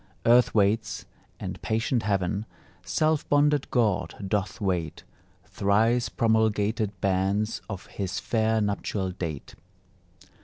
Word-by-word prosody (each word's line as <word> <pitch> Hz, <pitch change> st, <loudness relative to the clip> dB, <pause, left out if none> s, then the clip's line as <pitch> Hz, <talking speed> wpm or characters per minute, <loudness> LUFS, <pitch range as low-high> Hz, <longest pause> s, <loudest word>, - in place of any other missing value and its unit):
Earth 120 Hz, 0 st, +5 dB
waits, 105 Hz, +2 st, +1 dB, 0.3 s
and -, -, -6 dB
patient 115 Hz, +2 st, 0 dB
heaven, 100 Hz, 0 st, -1 dB, 0.4 s
Self 155 Hz, -, 0 dB
bonded 145 Hz, -1 st, +3 dB
God 100 Hz, -8 st, +1 dB
doth 100 Hz, 0 st, -1 dB
wait 90 Hz, -6 st, -2 dB, 0.4 s
Thrice 115 Hz, +4 st, +2 dB
promulgated 110 Hz, -3 st, +1 dB
bans 100 Hz, +3 st, 0 dB
Of 95 Hz, -3 st, -6 dB
his 100 Hz, -1 st, -4 dB
fair 110 Hz, -1 st, +1 dB
nuptial 100 Hz, -2 st, -1 dB
date. 85 Hz, -6 st, -6 dB
105 Hz, 105 wpm, -26 LUFS, 95-115 Hz, 0.4 s, Earth